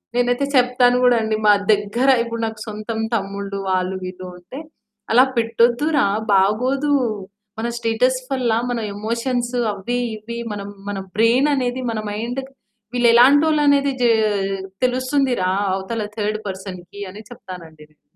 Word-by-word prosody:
నేనైతే 245 Hz, +3 st, +1 dB
చెప్తాను 250 Hz, -1 st, +4 dB
కూడా 245 Hz, -1 st, +5 dB
అండి. 220 Hz, 0 st, 0 dB
మా 210 Hz, -, +7 dB, 0.2 s
దగ్గర 210 Hz, +6 st, +1 dB
ఇప్పుడు 230 Hz, -1 st, -5 dB
నాకు 220 Hz, -1 st, -5 dB
సొంతం 215 Hz, +1 st, -5 dB, 0.2 s
తమ్ముళ్ళు 200 Hz, -1 st, -4 dB
వాళ్ళు 185 Hz, 0 st, 0 dB
వీళ్ళు 185 Hz, 0 st, -7 dB
ఉంటే 190 Hz, +11 st, -10 dB, 0.5 s
"అలా 245 Hz, +3 st, +7 dB
పెట్టొద్దు 235 Hz, +4 st, +2 dB
రా 245 Hz, -, +4 dB, 0.3 s
బాగోదు." 250 Hz, +9 st, +2 dB, 0.7 s
మన 235 Hz, -, -1 dB
స్టేటస్ 235 Hz, +3 st, +1 dB
వల్ల 250 Hz, -4 st, 0 dB, 0.2 s
మన 245 Hz, -1 st, -1 dB, 0.2 s
ఎమోషన్స్ 240 Hz, +3 st, -2 dB, 0.2 s
అవ్వి, 240 Hz, +5 st, -3 dB, 0.2 s
ఇవ్వి 235 Hz, +2 st, -7 dB
మనం 200 Hz, -1 st, -6 dB, 0.2 s
మన 200 Hz, -1 st, -3 dB, 0.2 s
బ్రెయిన్ 240 Hz, +6 st, +4 dB
అనేది 255 Hz, -1 st, -1 dB
మన 220 Hz, -, -3 dB
మైండ్ 235 Hz, +5 st, -3 dB, 0.5 s
వీళ్ళు 240 Hz, -1 st, +3 dB
ఎలాంటోళ్ళనేది 285 Hz, +2 st, +5 dB
జా 240 Hz, -, +5 dB, 0.8 s
తెలుస్తుంది 255 Hz, +1 st, +1 dB
రా, 185 Hz, -, +1 dB, 0.2 s
అవతల 210 Hz, +4 st, -3 dB
థర్డ్ 215 Hz, 0 st, -1 dB
పర్సన్‌కి 190 Hz, 0 st, -8 dB
అని 210 Hz, +3 st, -10 dB
చెప్తానండి 170 Hz, -9 st, -11 dB
నేను. 155 Hz, -, -33 dB
230 Hz, 135 wpm, -20 LUFS, 205-250 Hz, 0.8 s, మా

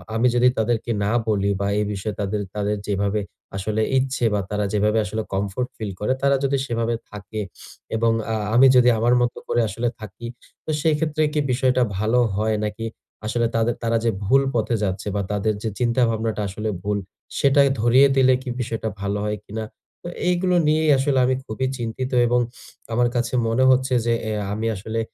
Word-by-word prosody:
আমি 115 Hz, +3 st, +3 dB
যদি 120 Hz, +1 st, +5 dB
তাদেরকে 115 Hz, +1 st, 0 dB
না 100 Hz, -, +1 dB, 0.2 s
বলি 100 Hz, -2 st, +1 dB
বা, 100 Hz, -, 0 dB
এ -, -, +2 dB
বিষয়ে 100 Hz, +1 st, -4 dB
তাদের 100 Hz, +1 st, -1 dB
তাদের 105 Hz, 0 st, -1 dB
যেভাবে 100 Hz, +1 st, 0 dB, 0.4 s
আসলে 110 Hz, +3 st, -1 dB, 0.2 s
ইচ্ছে 130 Hz, -2 st, 0 dB
বা, 105 Hz, -, +1 dB
তারা 105 Hz, 0 st, -1 dB
যেভাবে 105 Hz, +1 st, +2 dB
আসলে 110 Hz, +2 st, -3 dB
কমফোর্ট 100 Hz, +5 st, -1 dB
ফিল 105 Hz, -3 st, -4 dB
করে, 105 Hz, +5 st, +1 dB
তারা 140 Hz, 0 st, +3 dB
যদি 140 Hz, 0 st, +1 dB
সেভাবে 115 Hz, -2 st, -1 dB, 0.2 s
থাকে 105 Hz, +1 st, -6 dB, 0.5 s
এবং 115 Hz, +1 st, +2 dB, 0.2 s
আ -, -, 0 dB, 0.2 s
আমি 130 Hz, +3 st, +8 dB
যদি 125 Hz, -1 st, +6 dB
আমার 120 Hz, +2 st, +3 dB
মত 120 Hz, 0 st, +1 dB
করে 120 Hz, -, +2 dB
আসলে 115 Hz, +4 st, -2 dB
থাকি, 110 Hz, +2 st, -8 dB, 0.4 s
তো -, -, -8 dB
সেক্ষেত্রে 155 Hz, 0 st, +1 dB
কি 150 Hz, -, +1 dB
বিষয়টা 130 Hz, 0 st, +2 dB, 0.2 s
ভালো 110 Hz, +4 st, +2 dB, 0.2 s
হয় 110 Hz, +1 st, +1 dB
নাকি? 105 Hz, +2 st, -4 dB, 0.4 s
আসলে 115 Hz, +2 st, +1 dB
তাদের 115 Hz, +1 st, +1 dB
তারা 115 Hz, 0 st, +2 dB
যে, -, -, +4 dB, 0.2 s
ভুল 135 Hz, +7 st, +4 dB
পথে 115 Hz, +1 st, +1 dB
যাচ্ছে 95 Hz, +1 st, -2 dB
বা, 100 Hz, -, +1 dB
তাদের 105 Hz, +1 st, 0 dB
যে, 110 Hz, -, 0 dB
চিন্তা 120 Hz, +1 st, +1 dB
ভাবনাটা 110 Hz, -1 st, -1 dB
আসলে 105 Hz, +3 st, -3 dB
ভুল, 105 Hz, 0 st, 0 dB, 0.4 s
সেটা 140 Hz, +1 st, +4 dB, 0.2 s
ধরিয়ে 125 Hz, +4 st, +6 dB
দিলে 130 Hz, -1 st, +5 dB
কি 130 Hz, -, -6 dB
বিষয়টা 115 Hz, -2 st, -3 dB
ভালো 100 Hz, 0 st, -1 dB
হয় 105 Hz, 0 st, -1 dB
কিনা? 110 Hz, +2 st, -5 dB, 0.4 s
তো -, -, -8 dB, 0.2 s
এইগুলো 180 Hz, 0 st, +2 dB
নিয়েই 155 Hz, +1 st, +3 dB
আসলে 135 Hz, 0 st, +1 dB
আমি 130 Hz, +1 st, +2 dB
খুবই 120 Hz, +4 st, -2 dB
চিন্তিত 120 Hz, +2 st, -4 dB, 0.2 s
এবং 120 Hz, +1 st, +3 dB, 0.5 s
আমার 120 Hz, +1 st, +3 dB
কাছে 120 Hz, 0 st, -1 dB
মনে 115 Hz, +3 st, +2 dB
হচ্ছে 130 Hz, 0 st, +2 dB
যে, 120 Hz, -, +2 dB, 0.2 s
এ -, -, -1 dB, 0.2 s
আমি 110 Hz, +2 st, -2 dB
আসলে 110 Hz, +4 st, -4 dB
115 Hz, 185 wpm, -22 LUFS, 105-125 Hz, 0.5 s, আমি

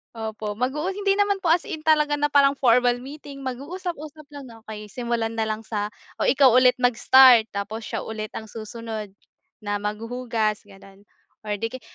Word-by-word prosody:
Opo, 220 Hz, -1 st, -5 dB
mag-uu 300 Hz, +9 st, -1 dB
hindi 395 Hz, 0 st, 0 dB
naman 405 Hz, -1 st, +1 dB
po 360 Hz, -, -3 dB
as 330 Hz, +2 st, +3 dB
in 315 Hz, -, -6 dB
talaga 300 Hz, -1 st, +3 dB
na 295 Hz, -, +2 dB
parang 280 Hz, -1 st, +4 dB
formal 245 Hz, -1 st, +3 dB
meeting, 280 Hz, +1 st, -10 dB
mag 260 Hz, -2 st, -4 dB
uusap-usap 310 Hz, -1 st, -7 dB
lang, 285 Hz, -1 st, -10 dB, 0.2 s
"Okey," 210 Hz, -1 st, -8 dB
simulan 235 Hz, -2 st, -2 dB
na 220 Hz, -, 0 dB
lang 215 Hz, +1 st, -3 dB
sa 210 Hz, -2 st, -3 dB, 0.3 s
"o, -, -, +1 dB
ikaw 265 Hz, -2 st, +5 dB
ulit 250 Hz, +1 st, +5 dB
mag-start, 245 Hz, -1 st, +6 dB
tapos 205 Hz, +3 st, -4 dB
siya -, -, -4 dB
ulit 215 Hz, -1 st, -5 dB
ang 220 Hz, -, -5 dB
susunod 220 Hz, 0 st, -7 dB, 0.6 s
na 205 Hz, 0 st, -2 dB
maghuhugas." 220 Hz, 0 st, -3 dB
gano'n 195 Hz, 0 st, -17 dB, 0.4 s
or 210 Hz, -, -1 dB
'di 225 Hz, +4 st, -4 dB
kay -, -, -51 dB
245 Hz, 175 wpm, -24 LUFS, 215-285 Hz, 0.6 s, mag-start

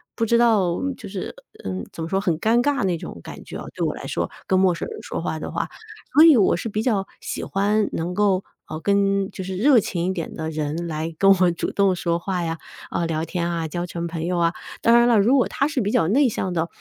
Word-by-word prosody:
不 230 Hz, -, 0 dB
知 235 Hz, -, +4 dB
道 210 Hz, -7 st, +3 dB, 0.2 s
就 205 Hz, -, -10 dB
是 190 Hz, -2 st, -5 dB, 0.3 s
嗯， 95 Hz, -1 st, -4 dB
怎 165 Hz, -, -6 dB
么 165 Hz, -, -5 dB
说， 195 Hz, 0 st, 0 dB
很 170 Hz, -6 st, 0 dB
尴 230 Hz, +4 st, +3 dB
尬 280 Hz, -4 st, +1 dB
那 180 Hz, -3 st, +1 dB
种 85 Hz, -, -8 dB
感 -, -, -9 dB
觉 -, -, -8 dB
啊， -, -, -7 dB
对 -, -, -3 dB
我 -, -, -1 dB
来 -, -, -8 dB
说， -, -, -2 dB, 0.2 s
跟 185 Hz, -1 st, +2 dB
陌 185 Hz, -2 st, +3 dB
生 -, -, -5 dB
人 440 Hz, -, -8 dB
说 -, -, -5 dB
话 -, -, -2 dB
的 -, -, -5 dB
话。 -, -, -2 dB, 0.5 s
所 305 Hz, +3 st, +8 dB
以 315 Hz, -6 st, +8 dB
我 200 Hz, -, +4 dB
是 225 Hz, -, -4 dB
比 215 Hz, +2 st, -2 dB
较 200 Hz, -6 st, 0 dB
喜 -, -, -4 dB
欢 205 Hz, +2 st, +1 dB
能 170 Hz, +2 st, -2 dB
够， 195 Hz, -1 st, +2 dB, 0.2 s
啊， 155 Hz, -, -6 dB
跟 200 Hz, -1 st, +2 dB
就 190 Hz, -, -6 dB
是 190 Hz, 0 st, -4 dB
热 250 Hz, +4 st, +5 dB
情 175 Hz, -3 st, -2 dB
一 -, -, +1 dB
点 170 Hz, -4 st, -5 dB
的 160 Hz, 0 st, -4 dB
人 155 Hz, +2 st, -3 dB
来 160 Hz, +1 st, -4 dB
跟 195 Hz, 0 st, +5 dB
我 180 Hz, -1 st, +5 dB
主 170 Hz, -, -3 dB
动 195 Hz, -2 st, +2 dB
说 170 Hz, -1 st, -1 dB
话 180 Hz, -1 st, -2 dB
呀， 165 Hz, 0 st, -2 dB, 0.3 s
啊， 170 Hz, -, -1 dB
聊 160 Hz, -1 st, -1 dB
天 170 Hz, 0 st, -2 dB
啊， 165 Hz, -2 st, -2 dB
交 175 Hz, +2 st, -3 dB
成 170 Hz, -1 st, -4 dB
朋 165 Hz, -1 st, -4 dB
友 180 Hz, 0 st, -1 dB
啊。 170 Hz, 0 st, +2 dB, 0.3 s
当 235 Hz, +1 st, +5 dB
然 240 Hz, -, +4 dB
了， 235 Hz, -3 st, +4 dB
如 245 Hz, +7 st, +4 dB
果 250 Hz, -, +3 dB
他 280 Hz, +2 st, 0 dB
是 300 Hz, -5 st, -1 dB
比 205 Hz, -3 st, 0 dB
较 165 Hz, -5 st, +2 dB
内 270 Hz, +4 st, +4 dB
向 190 Hz, -4 st, -2 dB
的， 170 Hz, -1 st, -1 dB
190 Hz, 280 characters per minute, -23 LUFS, 170-215 Hz, 0.5 s, 所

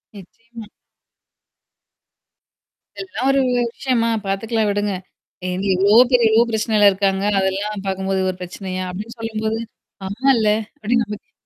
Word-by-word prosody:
நிச்சயமா. 230 Hz, +3 st, -12 dB, 2.3 s
இதெல்லாம் 375 Hz, -9 st, -3 dB
ஒரு 275 Hz, -, +2 dB
வி 250 Hz, -, 0 dB, 0.2 s
விஷயமா? 240 Hz, -4 st, 0 dB, 0.2 s
பாத்துக்கலாம் 215 Hz, +3 st, -1 dB
விடுங்க. 205 Hz, 0 st, -1 dB, 0.6 s
"ஏங்க 185 Hz, +2 st, -3 dB
எவ்வளோ 200 Hz, +4 st, +4 dB
பேர் 245 Hz, -2 st, +4 dB
எவ்வளோ 225 Hz, +2 st, +4 dB
பிரச்சனைையில 215 Hz, -2 st, +4 dB
இருக்காங்க. 195 Hz, 0 st, 0 dB, 0.2 s
அதெல்லாம் 195 Hz, +2 st, -2 dB
பாக்கும்போது 190 Hz, 0 st, -1 dB
இது 185 Hz, -, +1 dB
ஒரு 180 Hz, -, -16 dB
பிரச்சனையா?" 185 Hz, +1 st, -5 dB
அப்டின்னு 215 Hz, +6 st, -8 dB
சொல்லும்போது. 220 Hz, 0 st, -2 dB, 0.5 s
அம்மால்ல. 225 Hz, +1 st, +2 dB, 0.3 s
அப்டின்னு 235 Hz, +2 st, +1 dB
நமக்கே 210 Hz, 0 st, -9 dB
210 Hz, 120 wpm, -20 LUFS, 195-230 Hz, 2.3 s, எவ்வளோ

